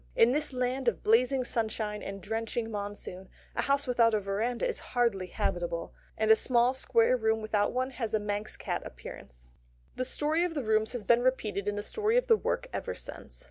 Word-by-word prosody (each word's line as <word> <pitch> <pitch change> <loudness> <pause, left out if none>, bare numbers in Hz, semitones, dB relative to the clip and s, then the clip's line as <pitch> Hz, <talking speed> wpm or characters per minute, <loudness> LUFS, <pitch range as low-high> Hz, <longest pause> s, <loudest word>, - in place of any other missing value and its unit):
In 235 - +6
this 295 +2 +1
land 255 0 -1
of 210 -8 +1
blazing 250 +4 +3
sunshine 215 -3 -2
and 195 -1 -7
drenching 225 +1 -2
monsoon 200 -2 -6 0.3
a - - +1
house 280 +1 +1
without 235 -3 +3
a - - +2
verandah 215 - -1
is 485 - -2 0.2
hardly 210 -7 +2
habitable, 175 -1 -2 0.2
and 220 0 +3
a - - +9
small 240 +2 +4
square 240 -2 +3
room 220 -2 +1
without 215 -1 0
one 255 +1 -1
has 230 -4 -2
a - - +2
Manx 205 0 -3
cat - - -3
appearance. - - -10 0.5
The 255 - 0
story 305 +5 0
of 350 -2 -2
the 285 - -1
rooms 220 +1 +1
has 245 -4 -4
been 235 +4 +4
repeated 215 -6 0
in 205 - 0
the 205 - -3
story 435 - +1
of - - +3
the 455 - +6
work 470 - -2
ever - - -3
since. - - -8
225 Hz, 200 wpm, -30 LUFS, 205-255 Hz, 0.5 s, a